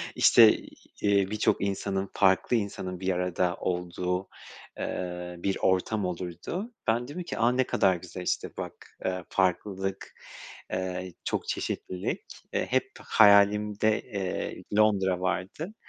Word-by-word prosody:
işte, - - +7 0.4
eee, 100 -2 +3
birçok 105 - +1
insanın, 100 0 -1
farklı 95 +4 +3
insanın 95 -4 -3
bir 95 0 -2
arada 90 0 0
olduğu, 90 +1 -2 0.5
eee, 90 -1 -4
bir 95 +2 -1
ortam 95 +2 +1
olurdu. 90 - -4 0.2
Ben 120 +2 +1
diyordum 175 +5 -5
ki, - - -5
a, 120 +2 +4
ne 130 +1 +2
kadar 95 -6 +2
güzel 90 +1 -8
işte - - -2
bak, - - -8
ııı, 95 -1 -2
farklılık, 95 +1 -1 0.6
ııı, 95 0 -3
çok - - -2
çeşitlilik, 90 0 -3 0.3
eee, - - 0
hep - - +1
hayalimde, 105 +1 +5
eee, 95 -3 -4
Londra 95 -4 +3
vardı 95 - -3
95 Hz, 125 wpm, -28 LUFS, 90-105 Hz, 0.6 s, işte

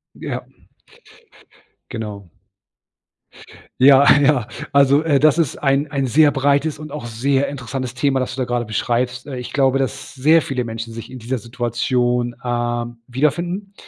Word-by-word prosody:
Ja. - - -5 1.5
Genau. 105 -5 -7 1.5
Ja, 140 +1 +7
ja. 140 -6 +2 0.3
Also, 140 +1 +4
äh, 145 -4 +2
das 155 +1 +4
ist 165 -6 0
ein 140 +1 +1
ein 135 -3 -1
sehr 150 +4 +4
breites 140 +2 +1
und 155 -1 -9
auch 150 -4 -6
sehr 135 +4 0
interessantes 130 -2 -5
Thema, 135 +1 +1
das 130 - -3
du 130 - -4
da - - 0
grade 120 -1 -2
beschreibst. 120 +4 -2
Äh, 135 -3 -6
ich 125 - -7
glaube, 135 -1 +2
dass 135 -1 -4
sehr 155 +5 +4
viele 130 -4 -3
Menschen 115 0 -6
sich 115 0 -9
in 130 - -8
dieser 125 +3 -3
Situation, 120 +1 -1
ähm, 120 -1 -2
wiederfinden. 170 +9 -1
130 Hz, 150 wpm, -20 LUFS, 120-140 Hz, 1.5 s, Ja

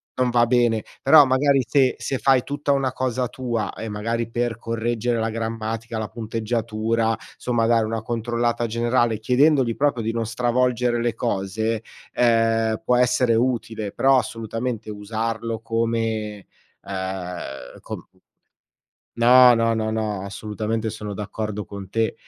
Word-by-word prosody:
non 125 -1 +1
va 120 0 +4
bene. 120 -2 +2 0.2
Però 145 +1 +8
magari 135 +1 +3
se 130 -1 +3
se 135 - -3
fai 135 -2 +3
tutta 145 0 -2
una 135 -2 +1
cosa 130 -1 -1
tua 120 -4 -3
e 110 - -6
magari 115 +2 -2
per 120 -1 -1
correggere 115 +1 -1
la 110 0 -1
grammatica, 115 0 -4
la 110 -1 -3
punteggiatura, 115 0 -1 0.2
somma, 120 -2 0
dare 115 -1 +3
una 110 0 -3
controllata 120 +1 -1
generale, 120 0 +1
chiedendogli 125 +1 +3
proprio 140 -5 +1
di 115 - -1
non 115 -1 -2
stravolgere 120 0 +1
le 120 -2 -1
cose, 110 +3 -1 0.3
ehm, 115 -2 +2
può 125 - +3
essere 125 -1 +3
utile. 115 -3 -1
Però 135 +3 +4
assolutamente 115 0 -4
usarlo 110 +2 -3
come, 115 -3 -2 0.4
uhm, 90 -9 -6
com - - -8 1.1
no, 125 +1 +8
no, 115 0 +2
no, 110 0 -1
no, 110 -3 -2
assolutamente, 110 +2 -3
sono 105 -1 -6
d'accordo 105 0 -4
con 100 -1 -9
te. 115 +1 0
115 Hz, 135 wpm, -23 LUFS, 110-120 Hz, 1.1 s, Però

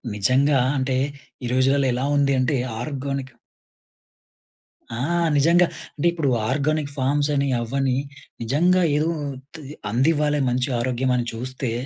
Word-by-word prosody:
నిజంగా. 130 +7 +3 0.2
అంటే 130 -1 0 0.5
ఈ - - -2
రోజులలో 135 +2 +3
ఎలా 130 +3 -1
ఉంది 140 -1 +3
అంటే 130 +3 +1 0.3
ఆర్గానిక్ 135 -1 -4 1.6
ఆ! - - -4 0.4
నిజంగా. 170 +5 +5 0.3
అంటే 160 +3 +1
ఇప్పుడు 160 -5 -1 0.2
ఆర్గానిక్ 145 +1 0
ఫార్మ్స్ 145 +3 +1
అని, 140 0 +1
అవ్వని 130 +2 0 0.5
నిజంగా 175 +9 +2
ఏదో 155 +2 +1 0.3
ఉత్తి 145 +4 -13 0.3
అందివ్వాలే 150 +3 +2
మంచి 125 +2 0
ఆరోగ్యం 130 +1 0
అని 120 - -1
చూస్తే, 125 +1 -4
135 Hz, 120 wpm, -23 LUFS, 130-150 Hz, 1.6 s, నిజంగా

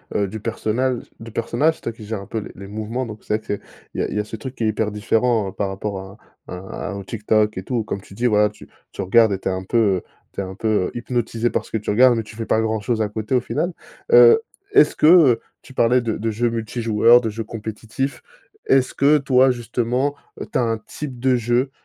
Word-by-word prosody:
heu, 100 - +1
du 110 +3 -6
personnage 115 +3 -1 0.2
du 115 0 -9
personnage. 130 +8 +1
C'est - - -20
toi - - -3
qui 110 -2 -12
gère 110 -2 -4
un 100 - -11
peu 110 - -5
les 105 - -8
les 100 +1 -10
mouvements, 110 +5 -4
donc 110 -1 -9
c'est 105 - 0
vrai 110 - -23
qu'il - - -13
y - - +1
a - - -1
il - - -5
y - - 0
a - - 0
ce 105 - -8
truc 125 +4 -7
qui 120 - -5
est - - +2
hyper 110 0 0
différent 110 0 +1
par 100 0 -2
rapport 95 0 -4
à 95 +2 -10 0.4
à - - -5 0.3
à - - -4
un 100 -1 -5
TikTok 105 0 0
et 95 - -4
tout. 120 +1 -1
Comme 100 -2 -5
tu 95 - -15
dis, 120 +5 0
voilà, 105 -2 +4
que - - -18
tu - - -15 0.2
tu - - -6
regardes 110 +3 +4
et 95 - -3
tu 95 - -2
es - - 0
un 95 0 -3
peu, 105 +5 -1
heu, 100 -5 +2 0.3
tu - - -3
es - - -2
un 95 - -7
peu, 110 +3 -4 0.2
heu, - - -13
hypnotisé 120 -1 -1
parce - - -3
que - - 0
tu 105 - -5
regardes, 125 +4 +5
mais 115 - 0
tu 110 +1 -13
fais 115 0 -4
pas 110 - +2
grand-chose 110 +1 -1
à 105 - 0
côté, 110 +3 -4
au 125 - +4
final. 175 +8 -2 0.4
Heu, 465 -1 +8 0.3
est-ce 405 - +5
que, 150 - +3
heu- 155 -9 +6 0.2
tu 130 - -14
parlais 125 0 +3
de 115 -2 -2
de 115 +2 -2
jeux 115 +2 0
multi-joueurs, 115 +1 +3
de 110 -3 -2
jeux 115 +1 -4
compétitifs- 115 +4 -5 0.5
est-ce 135 -1 +3
que, 145 +2 +4
toi, 130 -2 +4
justement, 125 +3 -1 0.3
tu - - -2
as - - +2
un 115 -1 0
type 125 +4 -8
de 130 +1 +3
jeu, 120 +3 0
115 Hz, 260 wpm, -21 LUFS, 105-125 Hz, 0.5 s, Heu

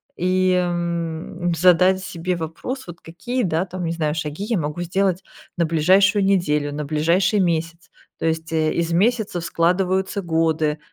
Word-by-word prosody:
и, 185 +1 +1
м, 170 -1 -2
задать 180 +2 +4
себе 180 -1 -3
вопрос 170 - -6
вот: 175 -1 -10
"Какие, 240 +10 -4
да, 165 0 0
там, 185 -1 -6
не 165 - -1
знаю, 155 -2 -1
шаги 155 +4 -4
я 225 0 0
могу 150 +1 -3
сделать 185 +1 0 0.4
на 170 - +2
ближайшую 190 +6 +3
неделю, 150 -7 +1
на 150 0 -4
ближайший 170 +7 +2
месяц?" 165 -1 -2 0.3
То - - -3
есть, 160 0 -2
э, 155 -1 +1
из 170 0 -1
месяцев 205 -2 +1
складываются 185 +4 0
годы. 160 -3 0
170 Hz, 155 wpm, -21 LUFS, 160-185 Hz, 0.4 s, задать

